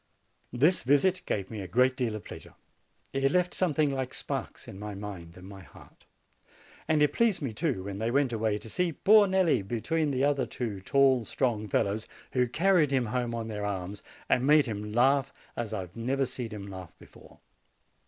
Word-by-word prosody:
This 150 +9 +3
visit 160 +8 +3
gave 100 0 -2
me 110 -2 -5
a 95 - -6
great 125 +6 +3
deal 120 -5 -1
of 110 - -7
pleasure; - - -11 0.6
it 135 0 +1
left 180 +1 +1
something 155 -5 +1
like 130 -2 -3
sparks - - -5
in 95 - -9
my 105 -1 -6
mind 95 -4 -8
and 90 +1 -11
my 100 -1 -10
heart. 90 - -17 0.8
And 155 -1 +3
it 145 -1 +2
pleased 230 -6 +2
me, 135 -8 -4
too, 125 - -1
when 100 0 -6
they 110 +1 0
went 135 0 +1
away, 110 -2 0
to 105 - -11
see 175 +8 -1
poor 210 +5 +5
Nelli 185 - +2
between 145 +10 -1
the 135 -1 0
other 140 -3 +1
two 110 -6 -4
tall, 135 +3 +3
strong 110 -2 -1
fellows, 100 +2 0 0.3
who 125 -1 +2
carried 170 +3 +3
him 130 -3 +1
home 120 +1 -2
on 115 -1 -4
their 105 -2 -4
arms, 100 0 -4 0.3
and 125 +2 +2
made 150 0 +6
him 105 -2 -5
laugh 135 +4 +3 0.2
as 115 -2 -4
I 110 - -2
have 90 -1 -11
never 130 +4 0
seen 125 -2 -6
him 105 -2 -7
laugh 95 -3 -10
before. - - -17
125 Hz, 195 wpm, -28 LUFS, 105-145 Hz, 0.8 s, made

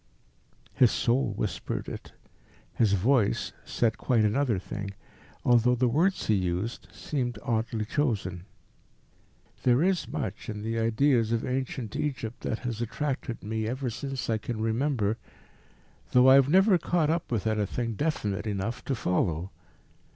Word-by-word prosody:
His 125 - +5
soul 120 +1 +1
whispered - - -3
it; - - -8 0.6
his 110 -4 +2
voice 105 - +2
said 115 -2 0
quite 115 -4 +2
another 115 0 +2
thing, 100 +1 -6 0.5
although 125 0 +5
the 125 +1 +2
words 170 +10 +2
he 110 - +3
used 95 +4 -2
seemed 125 -6 -3
oddly 115 -2 -1
chosen: 105 - -1 1.2
"There 125 +4 +4
is 185 -2 +1
much - - -4
in 105 -1 -5
the 115 +1 -1
ideas 115 0 +2
of 115 -1 0
ancient 130 -3 -3
Egypt 125 -6 -3
that 110 - -2
has 120 -2 -3
attracted 130 0 -3
me 110 +1 -2
ever 125 +1 -2
since 135 +4 -4
I 110 -1 +1
can 110 +1 -4
remember, 115 -1 0 1.0
though 125 +1 +7
I - - +9
have 135 0 +6
never 190 +2 +5
caught 165 -3 +1
up 165 -4 -2
with 115 -4 -1
anything 110 +2 -1
definite 110 -7 -1
enough 105 +4 -3
to 135 - 0
follow. 90 -3 0
115 Hz, 145 wpm, -28 LUFS, 110-135 Hz, 1.2 s, I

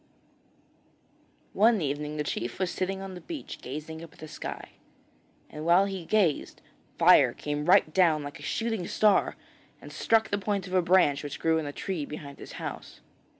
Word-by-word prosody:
One 220 +1 +4
evening 150 0 -3
the 150 - -1
chief 120 -4 -4
was 185 -2 -1
sitting 190 +1 -3
on 190 -1 -7
the 180 - -9
beach 320 -5 -7
gazing 155 +4 -7
up 165 - -12
at - - -21
the 155 - -9
sky. 155 - -7 0.8
And 150 - -8
while 175 +4 +5
he 190 -3 -5
gazed, 190 -6 +1 0.4
fire - - +6
came 150 0 -4
right 155 -3 +4
down 165 -5 +3
like 145 0 -8
a - - -13
shooting 225 -6 -2
star, 210 -2 +3 0.4
and - - -12
struck 225 -1 +2
the 205 - 0
point 200 -1 -2
of 185 - -8
a 185 - +4
branch 170 -5 +3
which 145 -1 -6
grew 160 0 +2
on 155 - -4
a - - -4
tree 175 +1 -4
behind 140 -2 -9
his - - -10
house. - - -7
170 Hz, 185 wpm, -28 LUFS, 150-195 Hz, 0.8 s, fire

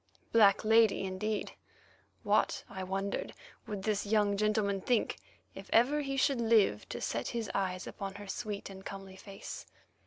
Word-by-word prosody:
"Black 210 -3 +5
lady" 220 -2 +5
indeed! 200 +3 -2 0.7
What, - - +2
I 190 -1 -6
wondered, 195 +1 -3 0.3
would 205 -2 -4
this 210 -1 0
young 205 -1 +2
gentleman 210 -1 +1
think 245 +1 +1 0.4
if - - -10
ever 270 +6 +4
he 275 -1 -3
should 270 -2 +2
live 220 - +3
to - - -4
set 115 +1 -2
his 230 -3 -3
eyes 185 -2 -1
upon 195 -1 -6
her 205 0 -8
sweet 200 +1 -4
and 190 0 -10
comely 195 -1 -8
face? 195 0 -9
205 Hz, 155 wpm, -32 LUFS, 195-220 Hz, 0.7 s, Black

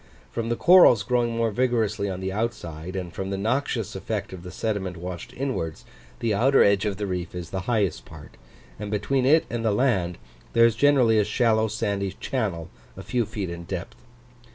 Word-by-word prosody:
From 115 -1 -3
the 120 - +1
corals 170 - +7
growing 120 +1 0
more 115 -1 +1
vigorously 110 -4 0
on 95 -1 -5
the 95 0 -2
outside, 95 -6 -4
and 90 -3 -5
from 95 0 -4
the 100 - -2
noxious 115 0 -1
effect 100 0 -4
of 90 - -8
the 90 - -9
sediment 95 -3 -3
washed 90 0 -7
inwards, 125 - -3 0.4
the 115 -2 +1
outer 130 +7 +4
edge 100 0 +3
of 100 -2 -1
the 105 - -2
reef 90 -2 -4
is 90 -2 -6
the 95 - -2
highest 105 -7 0
part, - - -13 0.4
and 105 -1 -5
between 125 +6 0
it 155 +3 +5
and 120 -1 -3
the 110 - +2
land 100 -7 +1 0.4
there 115 - +6
is 115 -2 +3
generally 125 -4 +4
a - - +4
shallow 110 +1 +2
sandy 100 -3 -2
channel 95 -10 -3 0.3
a - - -7
few 120 -4 -1
feet 105 -5 -4
in 85 0 -7
depth. 95 0 -6
105 Hz, 195 wpm, -25 LUFS, 95-115 Hz, 0.4 s, corals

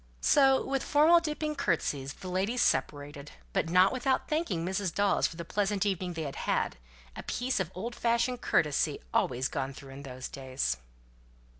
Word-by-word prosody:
So 270 - +4
with 270 0 -1
formal 310 +4 +5
dipping 305 -1 -2
curtseys 145 - -1
the 185 - -10
ladies 195 +7 0
separated, 145 0 -1 0.2
but - - 0
not 180 +5 +5
without 260 +1 0
thanking 260 - -1
Mrs. 190 0 -1
Dawes 200 +3 +2
for - - -10
the 170 0 -6
pleasant 205 +1 0
evening 185 -3 -1
they 165 -1 -4
had 140 -2 -5
had; - - -1 0.4
a - - -6
piece 250 -1 -1
of 185 -4 -1
old 230 +6 -4
fashioned 235 +1 0
courtesy 150 -3 +1 0.2
always 130 +1 +1
gone 135 -1 -4
through 135 0 -11
in 135 +1 -9
those 130 -2 -7
days. 130 - -2
185 Hz, 170 wpm, -30 LUFS, -, 0.4 s, formal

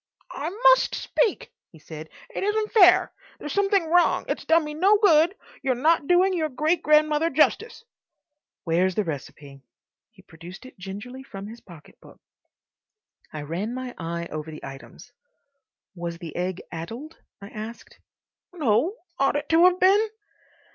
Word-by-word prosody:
"I 300 +3 -4
must - - +4
speak," 445 -5 -1 0.2
he 165 - -16
said. 155 0 -10 0.2
"It - - -4
isn't 425 +1 -1
fair. 365 -5 +6 0.3
There's 295 - -6
something 395 -3 +2
wrong. 345 +2 +2
It's - - -3
done 325 0 +4
me 300 - -6
no 385 +7 +4
good. 345 -2 +4 0.3
You're 265 -2 0
not 300 +3 +2
doing 365 +2 +4
your 320 -3 -1
great 305 +6 0
grandmother 305 +1 +3
justice." 445 - +1 0.8
"Where's 180 +2 +1
the 215 - +1
recipe?" 140 -3 -8 0.5
He - - -21
produced 175 +7 -12
it 260 - -15
gingerly 205 +8 -8
from 200 -7 -9
his 225 +3 -11
pocket 170 -5 -16
book. - - -17 1.1
I 150 -1 -6
ran 185 +10 -4
my 255 -1 -6
eye 170 0 -5
over 155 +1 -6
the 155 - -9
items. 135 0 -12 0.8
"Was 170 -2 -6
the 165 -2 -9
egg 180 +1 -3
addled?" 230 - -8 0.2
I 200 -1 -10
asked. 220 +2 -9 0.5
"No. 300 - +1 0.2
Ought 275 +1 +2
it 290 0 -3
to 330 +2 +5
have 365 0 +4
been?" 400 +4 +4
265 Hz, 155 wpm, -24 LUFS, -, 1.1 s, fair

